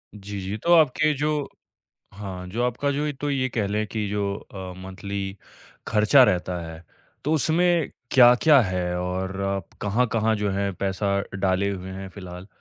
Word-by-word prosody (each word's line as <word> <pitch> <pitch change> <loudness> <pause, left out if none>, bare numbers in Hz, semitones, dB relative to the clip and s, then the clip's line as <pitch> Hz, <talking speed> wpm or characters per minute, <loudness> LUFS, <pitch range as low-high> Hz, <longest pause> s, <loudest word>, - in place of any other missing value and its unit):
जी, 100 0 -7
जी, 95 +3 -4
तो 170 +10 +2
आपके 155 -1 +4
जो 150 0 -1 0.7
हाँ 95 -2 -7
जो 115 +5 -2
आपका 125 +4 0
जो 145 +2 -1
ए - - -1
तो 145 - -1
ये 130 -2 0
कह 110 -4 -1
लें 105 +2 -1
कि 105 -1 -3
जो 100 -1 -1
अ, 95 -2 -9
मंथली 95 +1 -5 0.5
खर्चा 110 +5 +5
रहता 90 -5 0
है, 80 0 -9 0.4
तो 150 +4 +1
उसमें 165 +1 +2 0.2
क्या-क्या 130 +4 +7
है 90 -4 -1 0.2
और 90 +1 -2 0.5
कहाँ-कहाँ 110 +1 +1
जो 105 -1 -1
हैं 100 0 -1
पैसा 100 +1 -1 0.2
डाले 95 +1 +1
हुए 95 -1 -5
हैं 95 0 -7
फिलहाल, 90 -1 -10
105 Hz, 160 wpm, -24 LUFS, 95-130 Hz, 0.7 s, क्या-क्या